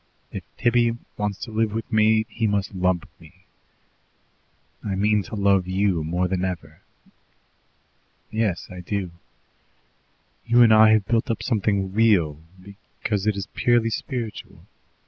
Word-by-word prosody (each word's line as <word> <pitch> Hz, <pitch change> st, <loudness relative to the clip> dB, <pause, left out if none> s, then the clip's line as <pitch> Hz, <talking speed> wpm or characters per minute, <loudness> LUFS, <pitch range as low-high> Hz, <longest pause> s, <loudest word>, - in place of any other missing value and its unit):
If -, -, -5 dB, 0.2 s
Tibby 120 Hz, 0 st, +2 dB, 0.2 s
wants 105 Hz, -1 st, -2 dB
to 115 Hz, -, -6 dB
live 110 Hz, -1 st, 0 dB
with 115 Hz, +1 st, -5 dB
me, 110 Hz, 0 st, +4 dB
he 115 Hz, -1 st, -2 dB
must 100 Hz, -2 st, -1 dB
lump 90 Hz, -2 st, 0 dB
me. 90 Hz, +3 st, -19 dB, 1.4 s
I 100 Hz, -2 st, -2 dB
mean 105 Hz, +2 st, +2 dB
to 100 Hz, -, -8 dB
love 100 Hz, -2 st, +2 dB
YOU 95 Hz, -3 st, 0 dB
more 90 Hz, +3 st, -1 dB
than 90 Hz, 0 st, -2 dB
ever. 90 Hz, -2 st, -5 dB, 1.5 s
Yes, 110 Hz, -5 st, -1 dB
I 90 Hz, -, -8 dB
do. 95 Hz, 0 st, -3 dB, 1.4 s
You 120 Hz, +1 st, +6 dB
and 110 Hz, -2 st, +6 dB
I 110 Hz, 0 st, +7 dB
have 110 Hz, -2 st, +2 dB
built 115 Hz, +1 st, 0 dB
up 115 Hz, -, -2 dB
something 100 Hz, -5 st, 0 dB
real, 95 Hz, -9 st, +3 dB, 0.6 s
because 105 Hz, -1 st, -1 dB
it 105 Hz, -, +2 dB
is 100 Hz, -1 st, -4 dB
purely 120 Hz, -2 st, +2 dB
spiritual. 115 Hz, -2 st, -5 dB
105 Hz, 140 wpm, -23 LUFS, 95-110 Hz, 1.5 s, I